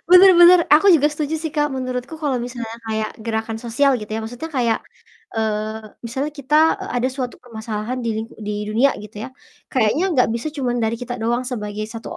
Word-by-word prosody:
Benar 365 +2 +9
benar, 345 +1 +9 0.2
aku 365 +5 +6
juga 295 -2 +5
setuju 300 +1 -3
sih, 320 - -2
Kak, 295 -2 +1
menurutku 255 +2 -4
kalau 285 -4 0
misalnya 235 -2 -5
kayak 220 -1 -2
gerakan 220 0 -2
sosial 250 +4 +1
gitu 210 -3 -8
ya, 220 - -2
maksudnya 245 +9 -6
kayak, 235 -5 +1 0.6
eee, 220 0 -2 0.2
misalnya 265 +5 -2
kita, 285 +1 0 0.3
eee, 385 - -6
ada 255 - +1
suatu 255 -2 -5
permasalahan 220 +1 -5
di - - -1
ling 220 +1 -4 0.2
di 210 - -2 0.2
dunia 235 +6 +3
gitu 210 +1 -12
ya. 260 - -6 0.4
Kayaknya 255 +5 +2
nggak 250 -6 +3
bisa 235 +7 -3
cuma 255 -3 -1
dari 230 -1 0
kita 245 0 -4
doang 240 +2 +1
sebagai 210 -3 -4
1 230 0 -8
245 Hz, 190 wpm, -21 LUFS, 220-280 Hz, 0.6 s, Benar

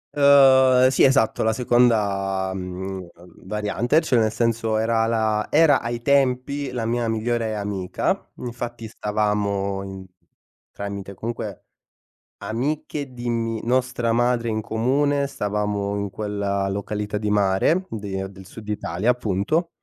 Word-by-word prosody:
Uhm, 130 -3 +6
sì - - +3
esatto, 130 -5 +3
la 110 0 +2
seconda, 100 -6 +1
mhmm, 95 0 -5 0.4
variante, 105 +7 +1
cioè 130 -7 +2
nel 110 -1 +2
senso 115 -1 0
era 115 0 +1
la 110 -2 0
era 155 -1 +5
ai 120 0 -4
tempi 140 +1 +1
la 120 -3 -3
mia 120 0 0
migliore 110 0 -1
amica, 100 -3 -2
infatti 120 -1 -6
stavamo 105 -2 -1
in 95 -1 -8 0.7
tramite 100 -1 -6
comunque, 110 -2 -6 0.7
amiche 140 +3 -3
di 120 -1 -4
mi 115 -1 -1
nostra 125 -1 0
madre 120 0 +1
in 110 -1 -1
comune, 140 +6 +1
stavamo 105 -4 -2
in 100 0 -3
quella 100 -1 -2
località 105 +1 -3
di 105 0 -2
mare, 105 - +2
di 100 -3 -5 0.2
del 95 -1 -13
Sud 105 +2 -11
Italia, 105 +2 0
appunto 125 - 0
110 Hz, 125 wpm, -23 LUFS, 100-125 Hz, 0.7 s, Uhm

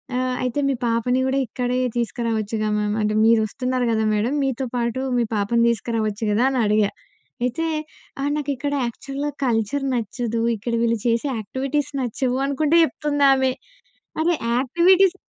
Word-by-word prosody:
ఆహ్, 255 0 0
అయితే 250 +3 -1
మీ - - +2
పాపని 235 +2 +1
కూడా 270 +1 +1
ఇక్కడే 250 +2 -1 0.2
తీసుకురావచ్చుగా 225 -2 -1
మ్యామ్ 210 0 0
అంటే, 210 0 0
మీరొస్తున్నారు 245 +3 +1
కదా! 220 -1 +1
మేడం 215 +5 0
మీతో 265 -1 -1
పాటు 235 +1 -1 0.2
మీ - - +3
పాపను 215 +3 +2
తీసుకురావచ్చు 225 -2 -2
కదా! 215 +4 +2
అని 265 -2 -1
అడిగా. 210 -1 +2 0.5
అయితే 250 +7 -1 0.6
ఆహ్, 285 +1 0
నాకిక్కడ 285 0 -2
యాక్చువల్‌గా 275 +5 -4
కల్చర్ 240 +4 0
నచ్చదు. 230 0 -2
ఇక్కడ 230 +3 -4
వీళ్ళు 230 -1 +1
చేసే 235 +4 +1
యాక్టివిటీస్ 265 +7 -2
నచ్చవు 250 +1 -1
అనుకుంట 290 +2 0
చెప్తుందామె. 275 -2 +2 0.7
అరే! 340 +2 +2 0.2
యాక్టివిటీస్ 350 +8 +4
245 Hz, 135 wpm, -22 LUFS, 225-275 Hz, 0.7 s, యాక్టివిటీస్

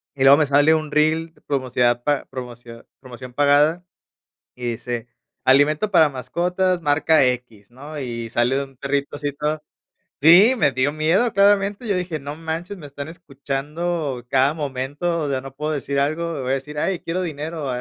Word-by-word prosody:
Y 135 - -1
luego 140 +1 +8
me 155 - +3
sale 145 +3 +4
un 155 -1 -3
reel 160 +2 +1
promocidad 125 -3 0
pa 145 -1 0
promocidad 120 -2 -10
promoción 125 -1 -11
pagada 145 +5 +3 0.7
y 120 -1 -3
dice: 120 0 -5 0.4
"Alimento 150 +9 +3
para 160 -5 +5
mascotas, 175 +8 -1
marca 150 0 +3
equis", 120 -4 -3
¿no? 145 +5 -9
Y 115 -3 -5
sale 125 +4 +1
un 135 -1 -17
perrito 140 +2 -2
así 145 -1 -3
todo 150 +2 -3 0.6
sí, 190 - +7
me 140 - +3
dio 130 +2 0
miedo 175 +10 +2
claramente. 200 +3 +2
Yo 200 - +1
dije: 175 -4 -3
"No 145 +2 -7
manches, 165 +4 -5
me 150 -4 -10
están 140 +1 -7
escuchando 145 -2 -4
cada 135 +2 +3
momento, 145 +4 -3
o 145 - -2
sea, 130 -1 -1
no 135 0 -11
puedo 150 +2 -3
decir 140 -1 -2
algo, 155 +1 -1
voy 130 +1 -2
a - - +2
decir 150 +2 -6
"ay, 185 +1 -1
quiero 180 +3 -3
dinero, 155 -1 -5
145 Hz, 170 wpm, -21 LUFS, 130-165 Hz, 0.7 s, luego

